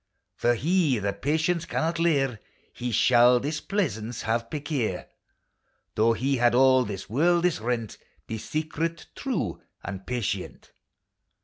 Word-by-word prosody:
For 120 Hz, 0 st, +2 dB
he 155 Hz, 0 st, +2 dB
that 100 Hz, -1 st, -3 dB
patience 160 Hz, +4 st, +1 dB
can -, -, -2 dB
not 165 Hz, +1 st, -1 dB
leir, 135 Hz, -8 st, +1 dB, 0.3 s
He 125 Hz, 0 st, -4 dB
shall 120 Hz, +1 st, +5 dB
displeasance 140 Hz, -, -2 dB
have 115 Hz, +1 st, -1 dB
perquier, 140 Hz, -, -2 dB, 0.9 s
Though 115 Hz, +2 st, +3 dB
he 135 Hz, +4 st, 0 dB
had 120 Hz, 0 st, +3 dB
all 130 Hz, 0 st, +5 dB
this 100 Hz, -3 st, -5 dB
worldis 170 Hz, -, +2 dB
rent: 115 Hz, -2 st, -2 dB, 0.3 s
Be 110 Hz, -, -5 dB
secret, 160 Hz, +4 st, -3 dB
true 270 Hz, -4 st, -3 dB, 0.2 s
and 95 Hz, -1 st, -7 dB
patient 125 Hz, -5 st, -4 dB
130 Hz, 125 wpm, -26 LUFS, 115-160 Hz, 0.9 s, shall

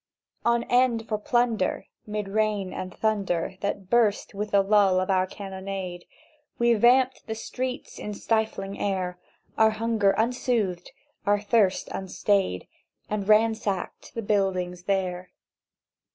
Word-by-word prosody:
"On 235 Hz, 0 st, +2 dB
end 245 Hz, -3 st, +2 dB
for 215 Hz, -2 st, -1 dB
plunder, 235 Hz, -3 st, +1 dB, 0.2 s
'mid 210 Hz, -1 st, -3 dB
rain 210 Hz, -2 st, 0 dB
and 185 Hz, 0 st, -5 dB
thunder 195 Hz, -4 st, -1 dB
That 200 Hz, -2 st, -3 dB
burst 220 Hz, -4 st, +2 dB
with 210 Hz, +1 st, -3 dB
the 200 Hz, -1 st, +4 dB
lull 195 Hz, -2 st, +4 dB
of 185 Hz, +1 st, 0 dB
our 185 Hz, 0 st, +2 dB
cannonade, 190 Hz, -2 st, -6 dB, 0.5 s
We 235 Hz, 0 st, +4 dB
vamped 250 Hz, +3 st, +3 dB
the 220 Hz, -, -3 dB
streets 255 Hz, +3 st, -5 dB
in 210 Hz, -, -5 dB
the -, -, -8 dB
stifling 220 Hz, -3 st, -1 dB
air— 185 Hz, -3 st, -2 dB, 0.4 s
Our 220 Hz, 0 st, +7 dB
hunger 220 Hz, -2 st, +1 dB
unsoothed, 225 Hz, -6 st, 0 dB, 0.4 s
our 205 Hz, 0 st, +4 dB
thirst 205 Hz, -2 st, +2 dB
unstayed— 190 Hz, -, 0 dB, 0.5 s
And 210 Hz, -1 st, -2 dB
ransacked 215 Hz, -2 st, +1 dB
the 230 Hz, -, -3 dB
buildings 185 Hz, -3 st, 0 dB
there. 185 Hz, -2 st, -1 dB
205 Hz, 130 wpm, -26 LUFS, 190-225 Hz, 0.5 s, Our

